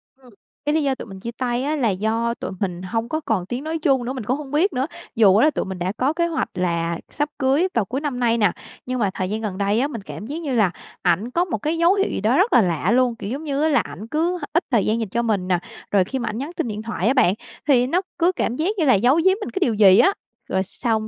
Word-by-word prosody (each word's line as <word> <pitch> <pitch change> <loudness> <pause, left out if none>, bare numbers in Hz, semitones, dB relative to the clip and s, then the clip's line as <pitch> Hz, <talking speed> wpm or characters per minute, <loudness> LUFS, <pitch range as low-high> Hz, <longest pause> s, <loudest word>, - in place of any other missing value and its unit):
Ừm, 260 -2 -20 0.4
cái 295 - +1
lý 315 - +2
do 275 -2 +1
tụi - - -8
mình 195 -2 -10
chia 235 +5 -5
tay 245 0 -1
á 300 +3 0
là 250 -7 +1
do 220 +4 0
tụi - - -4
mình 180 -3 -2
hông 225 +5 -3
có 310 - -1
còn 220 - -1
tiếng 245 +6 -4
nói 320 +1 -2
chung 270 -5 +2
nữa, 255 - -3
mình 255 -4 -5
cũng 255 +6 0
hông 290 -2 -8
biết 330 +4 +2
nữa. 255 +1 0 0.3
Dù 205 -4 +6
á 225 +8 +5
là 310 - +4
tụi - - -2
mình 190 -1 -6
đã 180 +2 -1
có 270 +4 +1
kế 340 +1 +1
hoạch 330 -1 -2
là 170 -2 -1
sắp 295 0 -2
cưới 280 +7 +3
vào 230 - +1
cuối 260 +8 -3
năm 280 -5 -3
nay 235 -1 +2
nè, 205 -5 +3 0.3
nhưng 255 0 -2
mà 205 -4 +2
thời 185 -1 -3
gian 215 +1 -2
gần 205 -4 -4
đây 205 +3 +1
á, 275 - +1
mình 230 -8 -6
cảm 205 - -8
giác 310 +4 -5
như 280 -6 -2
là 210 -6 +3 0.3
ảnh 185 +7 +1
có 350 +4 +1
một 315 - -2
cái 310 +9 -2
dấu 340 +2 +4
hiệu 395 0 +1
gì - - -3
đó 225 +8 +2
rất 395 +6 +3
là 240 - +7
lạ 175 0 0
luôn, 250 -1 +3
kiểu 200 -2 -6
giống 275 +5 -4
như, 290 -1 -1
á 315 - +3
là 280 -5 +4
ảnh 210 +1 -6
cứ 335 +7 0
ít 340 - +3
thời 230 -5 +3
gian 220 +2 +1
dành 220 -4 -3
cho 235 - 0
mình 210 -6 0
nè. 180 -2 +2 0.3
Rồi 200 -2 +4
khi 265 +8 -4
mà 235 -2 -2
ảnh 215 - -4
nhắn 285 +6 -4
tin 330 - -1
điện 215 -1 -4
thoại 220 -3 -2
á 255 - +4
bạn, 190 -9 +4 0.3
thì 250 -3 +4
nó 355 +7 +1 0.2
cứ 350 +2 +4
cảm 240 -9 -2
giác 315 +7 0
như 330 - +2
là 260 - +6
giấu 245 +8 +4
giếm 380 +4 +3
mình - - -4
cái 385 - -3
điều 235 -10 +2
gì 200 -2 +6
á. 385 - +5 0.4
Rồi 190 0 +1
xong 220 +2 -2
240 Hz, 300 wpm, -22 LUFS, 205-295 Hz, 0.4 s, là